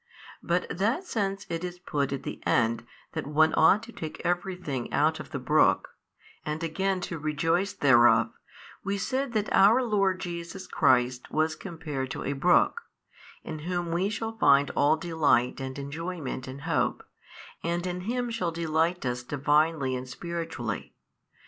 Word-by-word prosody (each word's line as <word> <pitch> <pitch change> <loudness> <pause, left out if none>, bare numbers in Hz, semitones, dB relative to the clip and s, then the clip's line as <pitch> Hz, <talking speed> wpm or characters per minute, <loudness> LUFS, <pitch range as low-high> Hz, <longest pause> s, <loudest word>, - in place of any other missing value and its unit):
But 175 +1 0
that 225 - 0
since 200 - -2
it 165 +1 -4
is 180 0 -5
put 145 -6 -2
at 140 - -3
the - - -6
end 115 -1 +1 0.2
that - - -4
one 155 +2 +3
ought 195 +7 +5
to 235 - -10
take 160 -8 -7
every 175 +2 0
thing 140 -9 -4
out - - +2
of - - -8
the - - -4
brook, - - +3 0.5
and 150 +2 -3
again 190 +3 -1
to 170 -2 -4
rejoice 165 +6 0
thereof, 120 -4 +5 0.5
we 200 0 -1
said 260 +5 -2
that 215 -2 -1
our 215 +7 +6
Lord 195 -5 +1
Jesus 170 +1 -6
Christ 125 0 +2
was 160 +1 +1
compared 150 -8 -5
to - - -5
a 140 - -1
brook, 175 - +3 0.6
in 155 - -6
Whom 175 +1 -3
we 180 +4 +1
shall 225 +1 -4
find 140 -5 +5
all 150 +2 +3
delight 155 -7 +1
and 130 0 -5
enjoyment 145 -1 -5
in 130 +2 -8
hope, - - 0 0.6
and 170 +1 -1
in 180 0 -3
Him 240 +4 -2
shall 185 -7 -1
delight 165 0 0
us 125 0 -1
Divinely 145 +1 +1
and 130 0 -6
spiritually. 165 - -5
165 Hz, 160 wpm, -28 LUFS, 140-185 Hz, 0.6 s, our